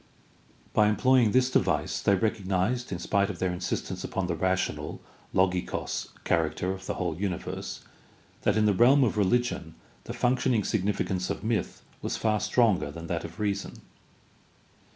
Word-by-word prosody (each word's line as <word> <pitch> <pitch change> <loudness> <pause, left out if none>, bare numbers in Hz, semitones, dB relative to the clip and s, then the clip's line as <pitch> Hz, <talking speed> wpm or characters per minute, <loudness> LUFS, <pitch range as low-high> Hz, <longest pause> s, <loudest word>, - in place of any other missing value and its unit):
By 105 - +5
employing 125 +1 +4
this 130 +2 +3
device - - +1
they 100 - +4
recognized, 105 +3 0
in 90 - -2
spite 100 +3 +1
of 100 - -5
their 95 +1 0
insist 90 0 -3
ence - - -5
upon 95 - -2
the 85 - -1
rational 95 +2 -1 0.4
(XoyLKos) 90 -1 0 0.2
character 85 +2 0
of 95 0 -7
the - - -2
whole 90 -3 -2
uni 95 0 -1
verse, - - -6 0.6
that 105 - +2
in 110 - +3
the 105 - +4
realm 130 +8 +6
of 115 - +1
religion 105 -5 0 0.3
the - - -5
functioning 125 -3 +1
significance 95 -3 -1
of - - -3
myth 110 -1 -2 0.2
was - - -2
far 110 -1 +1
stronger 110 -2 +2
than 85 0 -8
that 85 0 -2
of 85 0 -9
reason. 100 -2 -2
100 Hz, 160 wpm, -28 LUFS, 90-110 Hz, 0.6 s, realm